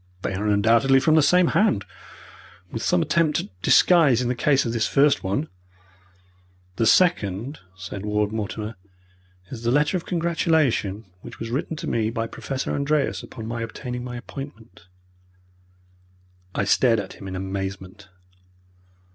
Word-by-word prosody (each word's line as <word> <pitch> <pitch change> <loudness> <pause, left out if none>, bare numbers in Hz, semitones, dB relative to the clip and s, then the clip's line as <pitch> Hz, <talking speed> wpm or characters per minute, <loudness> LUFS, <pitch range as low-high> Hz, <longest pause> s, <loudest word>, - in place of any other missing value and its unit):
"They - - -2
are 100 +3 -2
undoubtedly 115 +6 +4
from 155 +4 +2
the 160 - +6
same 180 +3 +4
hand 155 - +2 0.9
with 115 - -4
some 180 -2 +2
attempt 165 -2 +1
at 95 -3 -14
disguise 155 - +5
in 125 -1 -1
the - - +1
case 135 +2 +2
of 115 - -2
this 115 -2 +1
first 140 +1 +3
one." 100 +12 -1 1.3
"The 115 - +2
second," 130 - +2 0.2
said 95 +2 -7
Ward 105 0 0
Mortimer, 110 0 -4 0.7
"is 120 -4 -7
the 120 - -1
letter 145 +7 +2
of 170 - -8
congratulation 160 - 0 0.2
which 120 - -11
was 115 0 -5
written 145 +5 -2
to - - -6
me 110 -2 0
by 115 0 -2
Professor 130 +3 -4
Andreas 145 0 0
upon 115 -3 -9
my 115 +1 -4
obtaining 125 +2 -5
my 125 -1 -6
appointment." 120 - -10 1.7
I - - +1
stared 115 +3 +3
at 100 - -6
him 95 - -10
in 95 - -5
amazement. 95 +1 -6
115 Hz, 150 wpm, -23 LUFS, 105-145 Hz, 1.7 s, the